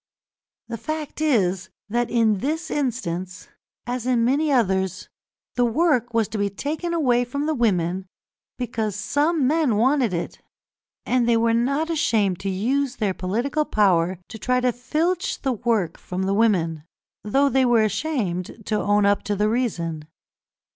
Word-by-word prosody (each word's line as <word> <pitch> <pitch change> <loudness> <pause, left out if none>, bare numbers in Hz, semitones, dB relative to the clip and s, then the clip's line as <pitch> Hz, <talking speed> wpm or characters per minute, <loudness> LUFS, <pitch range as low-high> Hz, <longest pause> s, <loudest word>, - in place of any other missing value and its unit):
The 230 -1 -5
fact 310 +1 -5
is 190 - +1 0.2
that, 240 +2 -1
in 220 -4 +2
this 310 - -2
instance, 185 -10 -3 0.4
as 245 0 -3
in 240 -2 +2
many 290 +5 +2
others, 190 -6 0 0.4
the 245 - +1
work 245 -2 +1
was 225 -2 +1
to 215 0 -4
be 200 0 +1
taken 305 - -4
away 255 -8 +2
from 280 +4 -3
the 315 - +1
women 190 - 0 0.5
because 220 -4 -2
some 290 +8 +1
men 295 -4 +2
wanted 255 +1 +2
it, 170 -1 -4 0.6
and 245 -2 +1
they 230 - +4
were 230 0 +2
not 280 +8 +1
ashamed 215 - +1
to 195 - -3
use 250 +8 0
their 205 -4 -1
political 235 +12 -1
power 185 - +2
to 220 - -9
try 250 +3 +1
to 250 0 +2
filch 320 +9 -1
the 265 -2 +1
work 215 -7 -1
from 185 +1 -4
the 195 +1 0
women, 175 -8 +1 0.4
though 270 +7 +2
they 265 -1 +3
were 240 -3 +4
ashamed 215 - -2
to 215 -1 0
own 205 0 +2
up 200 0 +3
to 205 - -1
the 210 +2 +1
reason. 170 -10 -2
230 Hz, 160 wpm, -23 LUFS, 200-270 Hz, 0.6 s, they